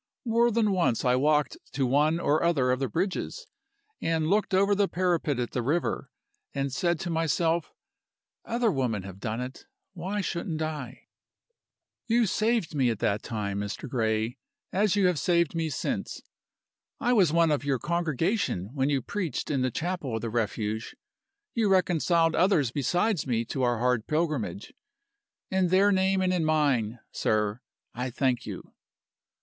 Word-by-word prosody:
More 235 +1 +3
than 220 -2 +2
once 170 -11 +1
I 125 0 +4
walked 150 +2 +2 0.2
to 135 -2 +1
one 150 +6 +2
or 155 -2 +2
other 140 -7 +2
of 130 - 0
the 135 - 0
bridges, 190 - -2 0.6
and 160 -1 0
looked 210 +1 +2
over 200 +2 +3
the 200 0 +2
parapet 175 -7 0
at 120 -1 -2
the 125 - -1
river, 150 +8 -1 0.5
and 140 -1 -1
said 170 +3 0
to 175 - -3
myself 165 +1 +1 0.7
'Other 235 -1 +1
women 120 - -1
have 95 0 -9
done 110 +2 -3
it: 125 +1 -8 0.3
why 190 +4 -3
shouldn't 170 -3 -3
I?' 145 -5 -6 1.0
"You 235 0 +3
saved 215 -3 0
me 135 -4 +2
at 115 - -1
that 100 +1 0
time, 100 -3 -3
Mr. 105 +7 -4
Gray 110 -1 -1 0.3
as 200 0 +2
you 200 -2 +3
have 180 -4 +2
saved 170 -4 +2
me 165 -1 -1
since. - - -3 0.8
I 250 -2 +2
was 190 -9 +4
one 165 -1 +3
of 145 -2 0
your 140 -2 +1
congregation 165 - -1
when 135 -1 +1
you 135 -4 0
preached 185 - -3
in 135 -3 +1
the 130 - +1
chapel 155 -3 -3
of 110 - -3
the 115 -1 -3
Refuge 110 -1 -2 0.6
You 225 -3 +1
reconciled 170 -3 +3
others 165 - +3
besides 175 - 0
me 115 -2 0
to 130 - -3
our 120 -2 +2
hard 125 -1 +1
pilgrimage. 150 - -2 0.8
In 190 -1 +2
their 190 +3 +4
name 190 0 +2
and 185 0 +2
in 175 -3 +1
mine, 140 -8 +1
sir, 105 +1 0 0.3
I 125 +2 -3
thank 125 -1 0
you. - - -8
155 Hz, 165 wpm, -27 LUFS, 125-185 Hz, 1.0 s, I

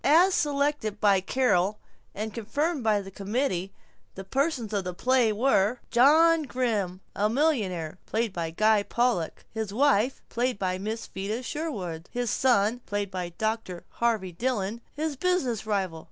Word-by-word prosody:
As 345 +7 +5
selected 285 - 0
by 200 -2 +4
Carol 210 -3 +1 0.4
and 215 +1 -4
confirmed 285 +7 -1
by 215 -2 +2
the 195 0 -10
committee, 195 -2 -2 0.4
the 195 - -6
persons 260 - -1
of 200 -2 0
the 180 -1 -5
play 250 +1 +3
were: 220 -1 +2
John 315 +6 +6
Grimm, 220 -9 -1
a 210 +1 +1
millionaire.... 205 - 0
Guy 215 -1 +1
Pollock 235 -6 -1
His 220 -2 -4
wife......... 255 0 +2
Miss 215 -3 -1
Vida 210 +6 -4
Sherwin 200 - -4
His 245 -2 -2
son......... 240 -2 +2 0.6
Dr. 220 -5 -2
Harvey 220 -6 0
Dillon 225 +2 -2
His 305 0 -3
business 260 - 0
rival. 190 -6 -1
220 Hz, 125 wpm, -27 LUFS, 195-260 Hz, 0.6 s, John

